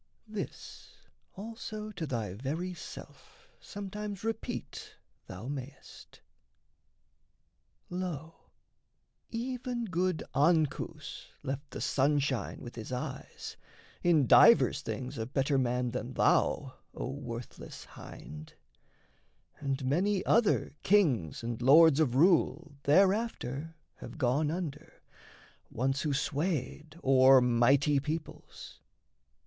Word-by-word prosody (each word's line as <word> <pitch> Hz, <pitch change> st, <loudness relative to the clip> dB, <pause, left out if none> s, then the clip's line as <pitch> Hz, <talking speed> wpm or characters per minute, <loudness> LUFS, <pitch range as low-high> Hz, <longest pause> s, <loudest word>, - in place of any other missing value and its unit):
This 215 Hz, -2 st, -8 dB, 0.4 s
also 215 Hz, 0 st, -6 dB
to 165 Hz, -6 st, -5 dB
thy 115 Hz, -8 st, -3 dB
very 155 Hz, -, -3 dB
self -, -, -12 dB
sometimes 205 Hz, 0 st, -6 dB
Repeat 225 Hz, 0 st, -5 dB, 0.3 s
thou 95 Hz, +6 st, -8 dB
mayst: 140 Hz, 0 st, -9 dB, 1.7 s
"Lo, 170 Hz, -3 st, -6 dB, 0.8 s
even 245 Hz, 0 st, -3 dB
good 180 Hz, -2 st, -1 dB
Ancus 155 Hz, +1 st, 0 dB, 0.2 s
left 140 Hz, +2 st, -4 dB
The -, -, -7 dB
sunshine 140 Hz, -2 st, 0 dB
with 120 Hz, 0 st, -9 dB
his 110 Hz, +2 st, -7 dB
eyes, 125 Hz, 0 st, -6 dB, 0.4 s
in 165 Hz, -5 st, +4 dB
divers -, -, +6 dB
things 130 Hz, 0 st, -5 dB
A 110 Hz, -, -3 dB
better 135 Hz, +1 st, +1 dB
man 125 Hz, -1 st, 0 dB
than 125 Hz, +1 st, -4 dB
thou, 135 Hz, -3 st, +2 dB, 0.2 s
O -, -, -4 dB
worthless 120 Hz, -4 st, -8 dB
hind; 75 Hz, +1 st, -11 dB, 1.0 s
And 135 Hz, -1 st, -2 dB
many 185 Hz, +8 st, +1 dB
other 230 Hz, -2 st, +3 dB
kings 140 Hz, -, +2 dB
and 115 Hz, 0 st, -4 dB
lords 155 Hz, +3 st, +7 dB
of 135 Hz, -6 st, +2 dB
rule 160 Hz, -1 st, +3 dB
Thereafter 165 Hz, -, +2 dB, 0.2 s
have -, -, -10 dB
gone 145 Hz, +2 st, +1 dB
under, 155 Hz, -3 st, -6 dB, 0.7 s
once 135 Hz, +3 st, -1 dB
who 150 Hz, -, -1 dB
swayed 150 Hz, +2 st, -2 dB
O'er 130 Hz, 0 st, +7 dB
mighty 130 Hz, +4 st, +3 dB
peoples. 155 Hz, +3 st, -7 dB
145 Hz, 100 wpm, -31 LUFS, 130-180 Hz, 1.7 s, lords